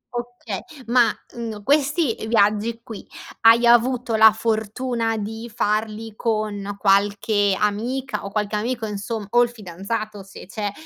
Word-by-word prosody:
Oka 240 -4 -5 0.3
ma, 240 0 +4 0.2
uhm, 225 -3 -6
questi 285 - +2
viaggi 220 +1 +2
qui, 225 -3 -9 0.4
hai 230 +1 +6
avuto 240 0 +3
la 220 0 +8
fortuna 225 +1 -1
di 220 +2 -6
farli 215 +1 -1
con 210 -3 -2
qualche 200 0 +2
amica, 240 +6 -2
o 200 - -5
qualche 210 +1 -2
amico, 230 +2 -2
insom 210 +1 -4
o 240 - +5
il 240 - +3
fidanzato, 210 0 -5
se 195 0 -12
c'è. 205 +2 -4
220 Hz, 135 wpm, -22 LUFS, 205-235 Hz, 0.4 s, la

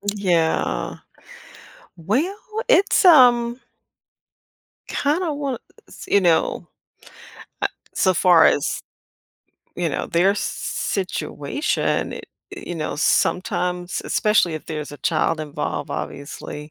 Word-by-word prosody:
Yeah. 165 - 0 1.0
Well, 260 - -1 0.3
it's, 400 -4 +4
um 245 -6 +6 1.3
kinda 310 +3 0
wanna 280 -3 -3 0.3
s - - -11
you 200 - +3
know, 170 -3 +1 0.9
uh, - - +2 0.3
so 185 -1 +2
far 175 -1 +5
as, 145 - +1 1.0
you - - 0
know, - - -3
their 175 +4 +3
s 205 - -1
s - - -2 0.5
situation, 190 - -2
i - - -8
i - - -7 0.5
you 175 - -4
know, 155 -2 -4
sometimes, 180 +2 0
especially 210 -6 +2
if 155 - -7
there's 150 -2 -5
a 145 - -10
child 160 -1 0
involved, 150 -2 -4
obviously, 150 +1 -6
180 Hz, 110 wpm, -22 LUFS, 160-245 Hz, 1.3 s, um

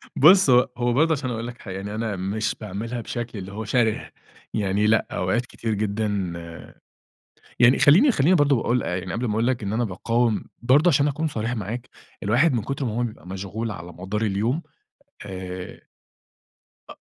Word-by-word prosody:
بُص، 180 +3 +7
هو 125 0 +5
هو 120 0 +1
برضو 160 +5 +3
عشان 135 -4 -2
أقول 115 -1 -3
لَك 125 0 -9
حاجة، 95 -4 -7
يعني 100 +2 -5
أنا 110 -2 -2
مش 100 +4 -2
باعملها 110 +4 -4
بشكل 115 -2 -5
اللي 95 +1 -8
هو 110 +2 -5
شَرِه. 110 0 +1 0.4
يعني 105 0 +1
لأ، 110 +1 +3
أوقات 110 +7 0
كتير 115 -2 -4
جدًا 105 +1 -1 1.5
يعني 125 +2 +6
خلِّيني 195 - +6
خلِّيني 170 - +3
برضو 145 -3 +4
باقول 120 +1 +1
يعني 90 +1 -3
قبل 120 +2 -2
ما 110 - -1
أقول 115 +2 +1
لَك 125 -3 0
إن 100 +1 -2
أنا 120 +2 +1
باقاوم 115 +3 0 0.2
برضو 140 +8 +5
عشان 145 -2 +3
أكون 150 +3 -1
صريح 115 -3 -2
معاك، 115 +3 -5 0.3
الواحد 120 +10 +3
من 120 - +1
كتر 135 +2 -3
ما 115 - -1
هو 120 +2 0
بيبقى 110 -8 -6
مشغول 100 +4 -4
على 85 -2 -8
مدار 95 +5 -4
اليوم، 110 +8 0 0.7
آآ 95 -1 -7 1.1
أ - - -9
115 Hz, 180 wpm, -24 LUFS, 100-125 Hz, 1.5 s, بُص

